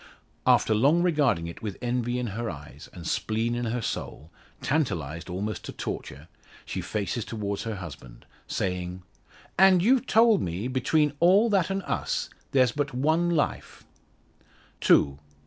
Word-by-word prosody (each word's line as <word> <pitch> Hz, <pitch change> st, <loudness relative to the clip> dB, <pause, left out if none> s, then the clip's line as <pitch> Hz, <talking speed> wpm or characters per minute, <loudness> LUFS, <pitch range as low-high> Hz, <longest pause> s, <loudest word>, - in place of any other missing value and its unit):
After 110 Hz, -, +4 dB
long 145 Hz, +11 st, +4 dB
regarding 140 Hz, -, +2 dB
it 85 Hz, +5 st, -8 dB
with 105 Hz, -4 st, -5 dB
envy 120 Hz, 0 st, -1 dB
in 125 Hz, -, -2 dB
her 115 Hz, +1 st, -3 dB
eyes, 75 Hz, -1 st, -10 dB
and 85 Hz, -2 st, -10 dB
spleen 110 Hz, +6 st, -1 dB
in 120 Hz, 0 st, -2 dB
her 115 Hz, +1 st, -2 dB
soul 80 Hz, -4 st, -5 dB, 0.3 s
tantalised, 90 Hz, -, -2 dB
almost 100 Hz, +4 st, -3 dB
to -, -, -5 dB
torture 70 Hz, +5 st, -6 dB, 0.4 s
she -, -, -4 dB
faces 105 Hz, +2 st, -2 dB
towards 100 Hz, -2 st, -4 dB
her 110 Hz, -1 st, -3 dB
husband, 70 Hz, -10 st, -10 dB, 0.2 s
saying 90 Hz, -1 st, -3 dB, 0.6 s
"And 190 Hz, -2 st, +6 dB
you've 260 Hz, +3 st, +3 dB
told 225 Hz, -2 st, +5 dB
me, 90 Hz, +7 st, -3 dB
between 145 Hz, +3 st, +1 dB
all 200 Hz, +6 st, +5 dB
that 195 Hz, -4 st, +2 dB
and 195 Hz, 0 st, -2 dB
us, -, -, -2 dB, 0.2 s
there's 130 Hz, -3 st, +4 dB
but 145 Hz, 0 st, -3 dB
one 160 Hz, +6 st, +2 dB
life 165 Hz, -4 st, -2 dB, 0.5 s
" -, -, -32 dB
"Two!" 70 Hz, 0 st, +4 dB
120 Hz, 150 wpm, -27 LUFS, -, 0.6 s, And